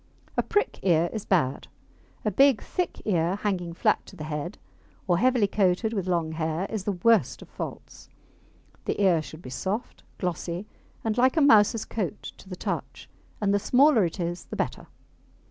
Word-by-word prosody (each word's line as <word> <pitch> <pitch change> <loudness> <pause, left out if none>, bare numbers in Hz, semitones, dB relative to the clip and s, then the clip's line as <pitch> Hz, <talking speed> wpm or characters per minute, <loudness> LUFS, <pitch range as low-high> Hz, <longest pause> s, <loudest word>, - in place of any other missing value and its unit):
A - - +3
prick 415 -1 0
ear 170 -2 +2
is 220 -3 -4
bad. 150 -9 +1 0.6
A 215 - +2
big, 270 +2 +5
thick 360 -1 -3
ear, 175 -3 +1
hanging 190 -4 -2
flat - - +2
to - - -12
the 155 - -7
head, 150 +2 -4 0.5
or 175 -2 +3
heavily 250 -2 +3
coated 200 +2 +1
with 195 -4 -2
long 170 -3 0
hair, 160 +2 -2
is 215 -4 -3
the 205 - 0
worst 225 +5 +2
of - - -17
faults. - - -8 0.8
The - - -2
ear 185 -5 +4
should 155 +2 -11
be 125 - -8
soft, 200 - -3 0.2
glossy, 180 +1 -3 0.4
and 225 +1 0
like 260 +5 +4
a - - +5
mouse's 220 -4 +5
coat 195 -8 -4
to 190 - -15
the 185 - -5
touch, - - -5 0.3
and 200 -1 +1
the 205 - +3
smaller 255 +1 +5
it 170 +2 -2
is 175 0 -3
the - - -7
better. - - -3
190 Hz, 180 wpm, -26 LUFS, 170-220 Hz, 0.8 s, big